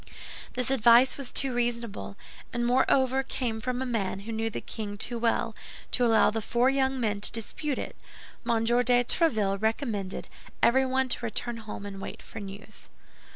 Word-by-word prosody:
This 250 +1 +1
advice 245 0 +6
was 275 -3 -5
too 270 -2 +2
reasonable, 235 - -2 0.3
and 240 0 -1
moreover 260 +1 +3
came 245 -4 -3
from 250 +3 -2
a - - -3
man 200 -6 -1
who 225 +3 -7
knew 225 0 -1
the 225 - -4
king 205 -2 -6
too 235 +3 -1
well, 230 0 +1 0.4
to 250 - +1
allow 225 -2 +5
the 225 +1 -2
four 240 +4 +2
young 265 -1 +1
men 210 -4 0
to - - -1
dispute 260 +5 -3
it. - - -5 0.5
M. 225 -1 +2
de 235 - +2 0.3
Tréville 215 - +1
recommended 220 -4 -1 0.4
everyone 260 +1 +3
to 245 - -2
return 230 +1 -2
home 215 -2 -7
and 195 -1 -7
wait - - -7
for 225 - -9
news. 200 +1 -10
235 Hz, 170 wpm, -28 LUFS, 215-255 Hz, 0.5 s, advice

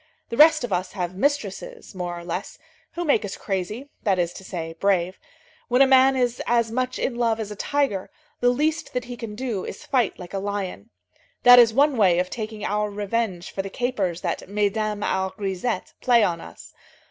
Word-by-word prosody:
The - - -3
rest 310 -3 +7
of 235 -5 -2
us 185 +1 -2
have 180 -3 -3
mistresses, 285 - -2
more 175 -2 -4
or 170 - -8
less, 175 +2 -5 0.4
who 345 - -3
make 285 -6 +3
us 205 - -5
crazy, 210 +8 -4
that 195 -3 +1
is 175 -1 0
to - - -10
say, 165 -4 -5
brave. 185 -2 +1 0.5
When 250 +2 +5
a - - +6
man 265 0 +5
is 245 -1 0
as 235 -1 +2
much 255 +2 -1
in 260 - -1
love 230 -2 0
as 210 -1 -4
a - - -5
tiger, 275 -6 -1 0.3
the 245 - +4
least 305 +5 0
that 250 -1 -2
he 245 - -7
can 230 -3 -7
do 225 -5 -3
is - - -7
to - - -14
fight 250 -7 +1
like 180 0 -10
a 195 - -1
lion. 195 - -4 0.5
That 245 0 +10
is 235 -2 +7
one 275 +3 +3
way 185 -5 +4
of 180 +1 0
taking 215 -2 -5
our 210 +1 0
revenge 205 -3 -2
for 195 - -2
the 195 - -6
capers 195 -7 -2
that 180 0 -3
mesdames 210 +1 0
our 190 0 -1
grisettes 195 +1 -3
play 240 -3 +5
on 170 -4 0
us. - - -12
210 Hz, 205 wpm, -24 LUFS, 190-245 Hz, 0.5 s, That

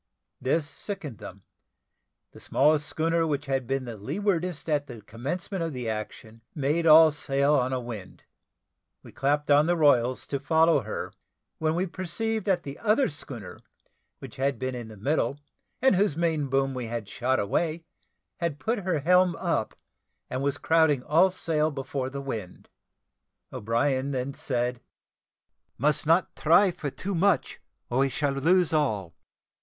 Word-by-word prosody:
This 145 +4 0
sickened 145 - -6
them; 95 +1 -10 0.9
the - - -14
smallest 150 +1 +2
schooner 165 +1 0
which 145 -1 -2
had 135 -3 -1
been 135 0 -1
the 115 -2 -7
leewardest 175 - -2
at 145 -2 0
the 110 -3 -10
commencement 165 - -4
of 165 -2 -3
the 125 -2 -4
action, 110 +1 -6
made 155 +3 0
all 160 0 +8
sail 140 0 +1
on 130 -3 +2
a 130 - -1
wind. 115 -6 -8 0.8
We - - -13
clapped 145 +2 0
on 145 +2 +5
the 175 - +3
royals 130 -4 +3
to 140 +1 -3
follow 160 +1 +3
her, 110 -1 -5 0.5
when 160 0 +1
we 180 +2 0
perceived 200 +4 -3
that 190 -3 +2
the 140 0 -8
other 230 +5 +2
schooner, 125 - -8 0.6
which - - -11
had 135 +1 0
been 130 0 -3
in 120 -2 -6
the 110 -1 -12
middle, 135 +3 0 0.4
and 265 -6 +5
whose 185 -5 +1
main 160 -4 0
boom 135 0 +1
we 125 -2 -4
had 115 -2 -4
shot 130 +5 0
away, 160 +11 -1 0.5
had 170 -4 -2
put 225 +7 -1
her 180 -6 -1
helm 180 +2 +4
up, 165 -12 -2 0.5
and 130 - -2
was 140 0 0
crowding 155 -2 +3
all 165 +7 +4
sail 160 -4 0
before 135 -2 -4
the 140 +1 -6
wind. 110 -9 -7 0.8
O'Brien 130 +5 0
then 135 0 -3
said, 125 -2 -2 1.0
"Must 150 +2 +1
not 165 +3 +3
try 175 +5 +4
for 150 -4 -5
too 195 +8 -5
much, 185 +1 +1 0.3
or 125 - +1
we 135 0 +3
shall 140 +1 -1
lose 165 +5 +2
all. 105 - 0
145 Hz, 160 wpm, -27 LUFS, 130-165 Hz, 1.0 s, all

